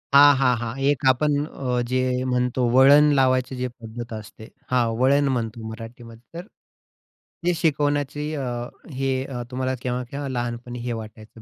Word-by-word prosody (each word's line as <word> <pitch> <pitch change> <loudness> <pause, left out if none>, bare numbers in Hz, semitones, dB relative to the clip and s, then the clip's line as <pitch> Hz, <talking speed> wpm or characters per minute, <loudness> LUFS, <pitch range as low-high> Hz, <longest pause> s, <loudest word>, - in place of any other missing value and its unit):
हां, 145 +1 +9
हां, 125 -2 +4
हां. 115 -1 -3 0.2
एक 145 -3 0
आपण 145 +3 +2
अ, 125 -5 -2
जे 130 0 0
म्हणतो 125 0 0
वळण 145 +3 +7
लावायची 130 -1 +2
जी 125 0 -2
पद्धत 115 +1 -7
असते. 110 0 -9 0.2
हां, 125 -2 +3
वळण 140 +2 +3
म्हणतो 115 -2 -4
मराठीमध्ये, 115 0 -10 0.2
तर 180 - -9 1.0
हे 180 - +3
शिकवण्याची 145 -1 0
अ, 140 - -3 0.5
हे 135 0 -1
अ, 125 -3 -5
तुम्हाला 130 +1 -1
केव्हा-केव्हा 125 +3 -3
लहानपणी 120 -1 -4
हे 120 - -2
वाटायचं 110 0 -10
125 Hz, 145 wpm, -23 LUFS, 120-140 Hz, 1.0 s, हां